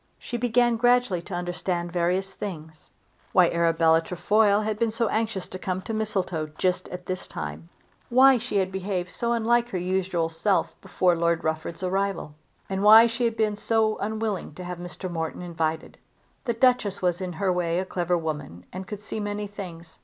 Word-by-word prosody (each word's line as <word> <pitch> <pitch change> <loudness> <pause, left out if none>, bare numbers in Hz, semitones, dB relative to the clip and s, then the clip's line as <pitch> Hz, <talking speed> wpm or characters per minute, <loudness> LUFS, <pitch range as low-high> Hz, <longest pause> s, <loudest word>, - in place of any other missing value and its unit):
She - - -7
began 240 0 +2
gradually 245 -6 +3
to 180 +1 -7
understand 175 0 -2
various 180 +3 0
things; 160 -6 -8 0.4
why - - +5
Arabella 165 -1 +3
Trefoil 205 +5 +2
had 215 0 -2
been 230 -1 +2
so 225 0 0
anxious 220 -4 -1
to 185 - -7
come 185 0 -2
to 225 - -4
Mistletoe 190 -7 -1
just 180 -1 0
at 180 0 -7
this 185 0 -4
time, 75 +2 -6 0.4
why 260 +1 +6
she 225 -2 -2
had 190 -1 +1
behaved 185 -2 -3
so 235 +7 -1
unlike 235 +1 +2
her 190 - -3
usual 180 -2 0
self 165 +5 0
before 180 -2 +2
Lord 170 0 +1
Rufford's 160 +3 -3
arrival, 195 -4 -1 0.3
and 190 0 -2
why 220 +2 +9
she 235 +1 -1
had 230 -1 -1
been 215 -1 +1
so 220 0 +1
unwilling 215 -6 -3
to 180 - -7
have 180 0 -6
Mr. 175 +1 -6
Morton 165 0 -4
invited. 160 -2 -3 0.5
The 235 - +1
Duchess 230 -5 +2
was 180 0 +1
in 180 -1 -3
her 190 +2 0
way 170 -1 0
a 185 - -1
clever 175 -1 0
woman 150 - -5
and 185 +1 -6
could 210 0 -6
see 215 +1 -5
many 205 0 -3
things. 180 -5 -9
185 Hz, 185 wpm, -26 LUFS, 170-215 Hz, 0.5 s, why